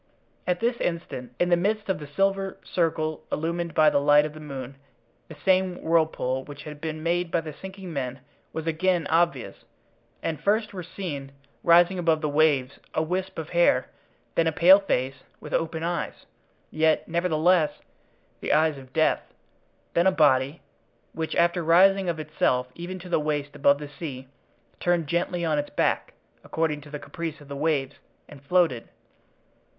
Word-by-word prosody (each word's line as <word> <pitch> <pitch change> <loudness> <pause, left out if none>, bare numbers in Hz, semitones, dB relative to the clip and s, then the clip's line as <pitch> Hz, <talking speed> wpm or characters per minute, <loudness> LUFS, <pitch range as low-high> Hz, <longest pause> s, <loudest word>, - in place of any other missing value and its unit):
At 180 -1 0
this 235 +1 +1
instant, 165 - -4
in 175 - +2
the 175 - +5
midst 205 +4 -1
of 190 -5 -1
the 150 - -8
silver 195 +5 0
circle 160 -3 -1
illumined 170 +2 -2
by 155 -1 +6
the 145 - +3
light 145 +1 +5
of 155 - -5
the 155 - -10
moon 135 -3 -7 0.5
the - - -10
same 185 -1 +2
whirlpool 160 -5 +1
which 145 0 -10
had 150 -1 -9
been 155 -1 -4
made 175 +1 0
by 165 - +1
the 155 -1 -7
sinking 190 0 -9
men 130 -2 -4 0.3
was 160 0 -5
again 170 +1 +1
obvious, 165 -6 +1 0.7
and 155 -3 -3
first 215 +3 +1
were 185 - -5
seen, 160 -6 -6 0.3
rising 175 +2 +5
above 165 -3 +2
the 150 - 0
waves, 145 -3 +2 0.2
a 155 - +2
wisp 185 +3 -3
of 160 -1 -5
hair, 170 -7 +3 0.4
then 165 - +2
a - - +2
pale 180 +5 +7
face 135 -9 -1 0.2
with - - -9
open 160 0 -1
eyes, 170 +1 -3 0.5
yet, 155 0 +2
nevertheless, 170 -2 +2 0.7
the - - -2
eyes 155 -2 +2
of 130 -1 -15
death; 160 -1 +2 0.7
then 170 +2 +3
a - - +6
body, 145 -3 +2 0.5
which, 160 -1 -3
after 170 +1 +2
rising 190 +3 +5
of 165 -2 -2
itself 125 -4 0
even 175 +4 -6
to 185 0 -10
the 175 - +1
waist 145 -1 -2
above 140 0 +4
the 145 0 -7
sea, 140 -3 -7 0.5
turned 175 -2 +1
gently 170 +2 -1
on 155 -2 +1
its 145 - -3
back, - - 0 0.3
according 160 -2 -1
to 150 - -13
the 150 - -5
caprice 155 +2 -6
of 145 - -15
the 140 - -6
waves, 145 -2 -1 0.3
and 140 - -13
floated. 160 -6 +1
160 Hz, 170 wpm, -26 LUFS, 145-175 Hz, 0.7 s, pale